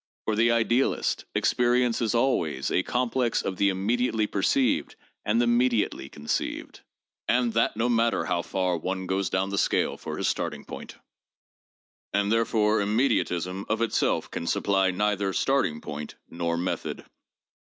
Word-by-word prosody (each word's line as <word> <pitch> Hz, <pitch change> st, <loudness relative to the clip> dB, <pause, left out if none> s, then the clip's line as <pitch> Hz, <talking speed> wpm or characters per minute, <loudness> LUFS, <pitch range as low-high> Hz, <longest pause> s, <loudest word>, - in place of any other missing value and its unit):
For 110 Hz, -, 0 dB
the 115 Hz, +2 st, +3 dB
idealist, 115 Hz, +3 st, +1 dB
experience 125 Hz, -1 st, +2 dB
is 115 Hz, 0 st, 0 dB
always 115 Hz, -, 0 dB
a -, -, +3 dB
complex 125 Hz, +2 st, 0 dB
of 95 Hz, -, -3 dB
the 100 Hz, -, +3 dB
immediately 110 Hz, +4 st, 0 dB
perceived 110 Hz, +6 st, +1 dB, 0.3 s
and 110 Hz, +3 st, +1 dB
the 120 Hz, -, +3 dB
mediately 120 Hz, -, +1 dB
conceived, 75 Hz, +1 st, -4 dB, 0.5 s
and 120 Hz, -2 st, +2 dB
that 115 Hz, -1 st, +1 dB
no 115 Hz, +2 st, +1 dB
matter 115 Hz, -1 st, +2 dB
how 85 Hz, -, 0 dB
far 90 Hz, -1 st, -1 dB
one 95 Hz, +3 st, -3 dB
goes 95 Hz, 0 st, -1 dB
down 95 Hz, +1 st, 0 dB
the 100 Hz, -, 0 dB
scale -, -, +1 dB
for -, -, -6 dB
his -, -, -1 dB
starting -, -, -2 dB
point; -, -, -9 dB, 1.2 s
and 100 Hz, 0 st, +1 dB
therefore 110 Hz, -1 st, +2 dB
immediatism 100 Hz, -4 st, 0 dB
of 110 Hz, +1 st, 0 dB
itself 115 Hz, -, 0 dB
can 85 Hz, -, -4 dB
supply 95 Hz, 0 st, +2 dB
neither 100 Hz, 0 st, 0 dB
starting 135 Hz, -, +1 dB
point 75 Hz, 0 st, -7 dB
nor 85 Hz, 0 st, -2 dB
method. 90 Hz, +2 st, -3 dB
105 Hz, 145 wpm, -26 LUFS, 95-120 Hz, 1.2 s, the